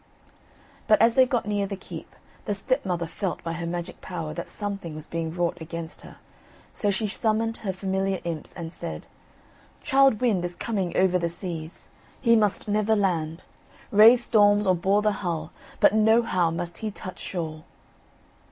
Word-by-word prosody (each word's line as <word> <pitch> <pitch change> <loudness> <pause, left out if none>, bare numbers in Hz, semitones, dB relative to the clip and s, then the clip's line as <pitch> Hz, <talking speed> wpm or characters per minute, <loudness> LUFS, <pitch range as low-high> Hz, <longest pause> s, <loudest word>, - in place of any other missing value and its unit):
But 215 - +5
as 230 +2 +5
they 260 +1 +5
got 245 -4 0
near 205 -1 0
the 200 - -4
keep, 190 - -10 0.3
the 205 - -1
stepmother 195 -6 -1
felt 180 +3 -4
by 165 - -3
her 170 0 -4
magic 175 +1 -5
power 165 -4 -5
that 170 +2 -6
something 200 -6 -5
was 155 0 -6
being 165 0 -3
wrought 175 0 -1
against 165 0 -7
her, - - -13 0.6
so 205 - -1
she 200 +2 0
summoned 225 +2 0
her 200 - -3
familiar 190 0 -1
imps 165 -3 -4
and 170 -2 -6
said: - - -6 0.8
"Childe 270 -5 +4
Wynd 215 -8 +1
is 175 0 -4
coming 195 -6 -2
over 185 -1 +3
the 170 -1 -1
seas; 170 -2 -7 0.3
he 230 -2 +4
must 210 -3 +1
never 215 +1 +2
land. 170 -5 -1 0.5
Raise 225 +4 +7
storms, 205 -2 +4
or 185 - +4
bore 195 +4 +2
the 215 - +3
hull, 165 -4 -3 0.3
but - - +5
nohow 220 -5 +3
must 170 +1 -5
he 220 - -2
touch 185 -2 -8
shore." 160 -4 -5
190 Hz, 170 wpm, -26 LUFS, 170-215 Hz, 0.8 s, Raise